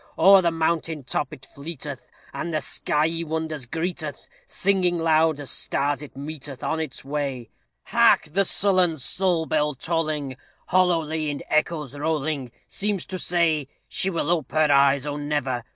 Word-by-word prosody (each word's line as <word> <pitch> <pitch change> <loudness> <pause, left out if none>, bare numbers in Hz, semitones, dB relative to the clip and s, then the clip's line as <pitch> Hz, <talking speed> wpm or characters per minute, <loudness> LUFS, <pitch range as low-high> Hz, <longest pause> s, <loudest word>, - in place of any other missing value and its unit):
O'er 195 0 +8
the 170 - +2
mountain 165 -2 -1
top 130 +2 -2
it 135 -4 -11
fleeteth, 140 -2 -7 0.3
And 155 +5 -4
the 155 - 0
skyey 160 +3 -1
wonders 160 -4 -4
greeteth, 160 -1 -4 0.2
Singing 185 -2 +1
loud 160 -2 +3
as 145 - -4
stars 145 0 -1
it 145 -2 -11
meeteth 140 -2 -7
On 160 - -1
its 155 -4 -5
way. 135 -4 -3 0.3
Hark! - - +4
the 200 +2 +4
sullen 185 -4 +3
Soul 175 +4 +1
bell 150 -2 0
tolling, 155 -3 -2 0.3
Hollowly 165 -4 +2
in 145 - -4
echoes 155 -3 0
rolling, 145 -3 -2 0.2
Seems 205 -2 -1
to 185 - -5
say 165 -6 +1 0.2
"She 190 - +1
will 170 -3 -1
ope 165 -5 -1
her 155 -1 +3
eyes 140 0 +4
oh, 145 0 -3
never! 145 -4 -2
155 Hz, 150 wpm, -24 LUFS, 145-170 Hz, 0.3 s, O'er